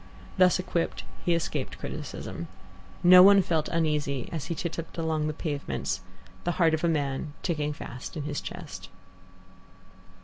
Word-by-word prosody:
Thus 180 Hz, -1 st, +6 dB
equipped, 180 Hz, -2 st, -2 dB, 0.2 s
he 175 Hz, -, +3 dB
escaped 165 Hz, -, -3 dB
criticism. -, -, -6 dB, 0.6 s
No 180 Hz, +1 st, +10 dB
one 200 Hz, +1 st, +8 dB
felt 160 Hz, -3 st, 0 dB
uneasy 150 Hz, -5 st, 0 dB
as 160 Hz, -4 st, -3 dB
he 170 Hz, -, -3 dB
titupped 165 Hz, 0 st, -5 dB
along 160 Hz, -2 st, 0 dB
the -, -, 0 dB
pavements, 145 Hz, -2 st, -3 dB, 0.4 s
the 175 Hz, -, 0 dB
heart 165 Hz, -2 st, +3 dB
of 160 Hz, -, 0 dB
a -, -, +4 dB
man 145 Hz, -1 st, -1 dB
ticking 150 Hz, -4 st, 0 dB
fast 130 Hz, -1 st, -7 dB
in 150 Hz, -, -3 dB
his 145 Hz, 0 st, -3 dB
chest. 145 Hz, -, -8 dB
160 Hz, 145 wpm, -28 LUFS, 150-170 Hz, 0.6 s, No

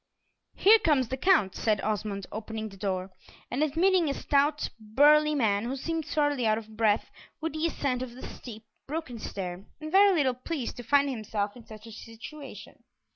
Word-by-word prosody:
"Here 440 Hz, +3 st, +6 dB
comes 275 Hz, -, +2 dB
the 265 Hz, -, -1 dB
Count," 285 Hz, -, +3 dB
said 215 Hz, -3 st, 0 dB
Osmond, 205 Hz, -2 st, -2 dB
opening 220 Hz, 0 st, -5 dB
the 195 Hz, -, -13 dB
door, 185 Hz, -1 st, -3 dB, 0.4 s
and 255 Hz, -, -1 dB
admitting 330 Hz, +3 st, +3 dB
a 275 Hz, -, -1 dB
stout, 290 Hz, +1 st, +1 dB
burly 295 Hz, +7 st, +4 dB
man, 215 Hz, -5 st, +1 dB
who 255 Hz, +3 st, -2 dB
seemed 325 Hz, +3 st, -3 dB
sorely 290 Hz, -5 st, +1 dB
out 215 Hz, 0 st, +3 dB
of 220 Hz, -1 st, -9 dB
breath 215 Hz, -1 st, +1 dB, 0.3 s
with 320 Hz, -2 st, -3 dB
the 315 Hz, +1 st, 0 dB
ascent 265 Hz, -6 st, -2 dB
of 245 Hz, -2 st, -6 dB
the 260 Hz, -, -9 dB
steep, 220 Hz, -3 st, -10 dB, 0.2 s
broken 280 Hz, -5 st, -5 dB
stair, 185 Hz, -3 st, -5 dB, 0.2 s
and 310 Hz, 0 st, -7 dB
very 395 Hz, +2 st, +6 dB
little 270 Hz, -5 st, +2 dB
pleased 255 Hz, 0 st, -4 dB
to 245 Hz, -, -7 dB
find 280 Hz, +4 st, +3 dB
himself 215 Hz, -3 st, -3 dB
in 235 Hz, -2 st, -14 dB
such 215 Hz, 0 st, -11 dB
a 225 Hz, -, -10 dB
situation. 230 Hz, +6 st, -11 dB
250 Hz, 180 wpm, -28 LUFS, 215-300 Hz, 0.4 s, Here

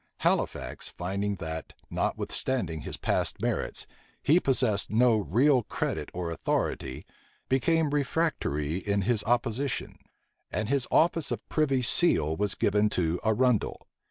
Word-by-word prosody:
Halifax, -, -, -1 dB
finding 100 Hz, +3 st, -3 dB
that, 80 Hz, -3 st, -6 dB, 0.2 s
notwithstanding 90 Hz, -, -2 dB
his -, -, -5 dB
past -, -, -1 dB
merits, -, -, -1 dB, 0.4 s
he 160 Hz, +5 st, +5 dB
possessed 125 Hz, -, +2 dB
no 115 Hz, +1 st, +4 dB
real 120 Hz, -, +3 dB
credit -, -, -3 dB
or 85 Hz, -2 st, -4 dB
authority, 65 Hz, -5 st, -2 dB, 0.4 s
became 150 Hz, +4 st, +2 dB
refractory 140 Hz, -, -1 dB
in 100 Hz, +1 st, -1 dB
his 115 Hz, 0 st, +1 dB
opposition; 120 Hz, +3 st, -1 dB, 0.5 s
and 105 Hz, +1 st, -2 dB
his 140 Hz, -2 st, +1 dB
office 165 Hz, -2 st, +2 dB
of -, -, -4 dB
privy 135 Hz, -5 st, +1 dB
seal 80 Hz, -, +4 dB
was 100 Hz, +3 st, 0 dB
given 105 Hz, +1 st, +2 dB
to 85 Hz, -3 st, 0 dB
Arundel. 115 Hz, +1 st, +1 dB
110 Hz, 125 wpm, -28 LUFS, 95-135 Hz, 0.5 s, he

